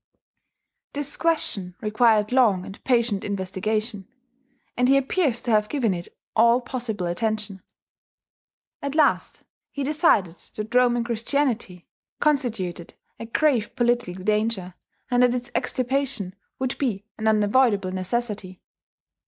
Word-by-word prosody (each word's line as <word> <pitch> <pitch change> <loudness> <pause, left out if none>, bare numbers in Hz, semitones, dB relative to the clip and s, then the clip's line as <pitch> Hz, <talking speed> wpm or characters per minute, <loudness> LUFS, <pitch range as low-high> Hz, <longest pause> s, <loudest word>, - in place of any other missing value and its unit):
This 290 0 -3
question 210 - -1
required 215 0 +3
long 215 -8 +3
and 195 - -11
patient 235 -5 +1
investigation; 200 +2 -2 0.7
and 250 +1 +2
he 275 - +6
appears 275 -3 +1
to 240 - -1
have 210 -1 +3
given 245 -9 +1
it 175 -1 -5 0.3
all 235 +2 +5
possible 240 -6 -4
attention. 210 +2 -2 1.2
At 280 +1 -3
last 305 -2 +2 0.3
he 280 - -4
decided 275 - +2 0.2
that 215 +2 -5
Roman 245 -1 +4
Christianity 235 -5 -1 0.3
constituted 220 - -1 0.2
a 230 - -6
grave 245 -3 +1
political 240 -7 0
danger 210 -3 0 0.4
and 245 0 +4
that 250 0 +4
its 245 -1 -5
extirpation 255 -6 -1 0.2
would 260 -1 -2
be 210 -8 -1
an 220 - -1
unavoidable 210 -2 +3
necessity. 190 0 -3
230 Hz, 120 wpm, -24 LUFS, 200-250 Hz, 1.2 s, he